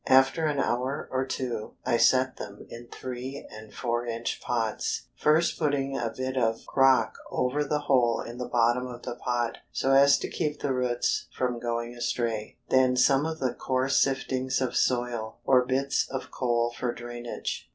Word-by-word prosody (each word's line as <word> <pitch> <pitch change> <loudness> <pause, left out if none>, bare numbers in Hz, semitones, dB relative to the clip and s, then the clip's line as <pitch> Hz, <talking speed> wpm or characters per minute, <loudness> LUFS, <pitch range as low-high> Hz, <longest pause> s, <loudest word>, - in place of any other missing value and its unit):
After 135 +5 +5
an 150 -2 0
hour 130 +1 -1
or 130 0 0
two 120 -5 -4
I 120 - +2
set 130 +2 +3
them 100 0 -8
in 120 +1 -9
three 130 +3 -6
and 110 0 -11
four 120 -1 -2
inch 115 -1 -3
pots, 115 -3 -1
first 155 +3 +2
putting 140 -3 0
a 120 -1 -1
bit 130 +2 -4
of 115 -3 0
crock 135 -1 +3
over 130 +4 0
the 150 +1 -1
hole 125 -5 +3
in 120 +1 -7
the 125 - -4
bottom 120 +1 +2
of 120 -1 -9
the - - -4
pot, 120 -1 -2
so 135 - 0
as 140 +1 +7
to - - -4
keep 150 -1 -2
the 140 - 0
roots 125 -1 0
from 125 -2 0
going 120 0 -3
astray, 115 -2 -2
then 130 -1 +4
some 135 +3 +4
of 160 0 -4
the 130 -5 -1
coarse 130 +1 +2
siftings 130 -1 -1
of 130 -2 -1
soil, 120 -3 0
or 130 -2 +6
small 125 - -6
bits 140 0 0
of 135 - -5
coal 120 -2 0
for 125 - -1
drainage. 120 0 -5
125 Hz, 180 wpm, -27 LUFS, 120-135 Hz, -, as